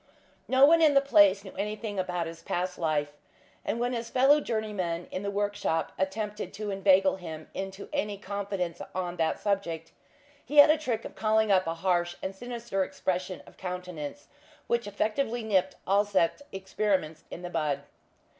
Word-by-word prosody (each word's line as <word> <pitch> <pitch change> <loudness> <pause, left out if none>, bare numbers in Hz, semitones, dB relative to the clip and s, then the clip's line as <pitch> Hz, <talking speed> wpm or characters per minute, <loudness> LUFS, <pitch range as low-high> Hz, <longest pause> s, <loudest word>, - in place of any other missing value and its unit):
No 265 +1 +6
one 330 +3 +6
in 305 -3 +5
the - - +9
place 205 -8 +5
knew 190 - -10
anything 210 0 -3
about 180 -2 -1
his 165 0 -8
past 180 +1 -3
life, 150 -3 0 0.5
and 230 - -2
when 245 +1 0
his 230 -1 -3
fellow 270 +4 +5
journeymen 205 -8 -2
in 185 - -3
the 200 - -2
workshop 205 -5 -1
attempted 210 +2 -3
to 210 -1 -4
inveigle 195 -1 +4
him 160 -4 -8
into 195 +1 -6
any 210 -8 -1
confidence 195 -4 -4
on 180 -1 -3
that 160 -1 0
subject, 170 -6 -2 0.5
he 295 +3 -4
had 290 +1 +10
a 315 - +3
trick 240 -7 -2
of - - -7
calling 220 -1 +2
up 185 -3 +4
a 165 - -1
harsh 175 0 0
and 190 0 -3
sinister 235 -3 -3
expression 185 0 -3
of - - -17
countenance 180 - -6 0.4
which 235 -2 0
effectually 220 +4 -1
nipped 190 -3 +1
all 200 +1 +4
such 200 +1 +1
experiments 190 -4 -1
in 175 - -8
the 175 - -5
bud. 150 -4 0
195 Hz, 170 wpm, -28 LUFS, 180-220 Hz, 0.5 s, had